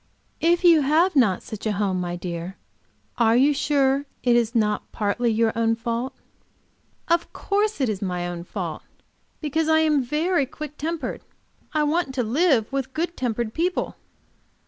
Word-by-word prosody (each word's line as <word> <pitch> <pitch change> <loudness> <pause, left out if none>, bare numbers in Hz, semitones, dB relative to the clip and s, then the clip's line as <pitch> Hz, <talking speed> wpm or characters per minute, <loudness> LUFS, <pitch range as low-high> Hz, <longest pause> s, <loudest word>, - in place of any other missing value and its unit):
"If 345 +2 +2
you 335 -3 +7
have 315 +6 +3
not 215 -9 +3
such 215 0 -6
a 215 - +1
home, 195 -3 0
my 175 -1 -3
dear, 175 +1 -6 0.6
are 230 -1 +4
you 275 +4 +5
sure 280 -1 +1 0.2
it 245 -1 +4
is 235 0 +1
not 210 -2 0
partly 225 +3 0
your 225 0 +2
own 225 0 +2
fault?" 235 +3 -3 0.9
"Of 340 0 +1
course 415 0 0
it 265 - +2
is 210 -3 -2
my 180 -2 -2
own 175 -1 -5
fault. - - -5 0.6
Because 315 +1 0
I 315 0 +5
am 305 -3 +3
very 300 +3 0
quick 300 +1 -8
tempered 325 +2 -4 0.5
I 305 -1 +1
want 300 -2 0
to 250 - +1
live 265 -1 +2
with 265 -1 -3
good 340 +2 -2
tempered 235 -2 -2
people." 355 +3 -1
265 Hz, 165 wpm, -24 LUFS, 220-310 Hz, 0.9 s, you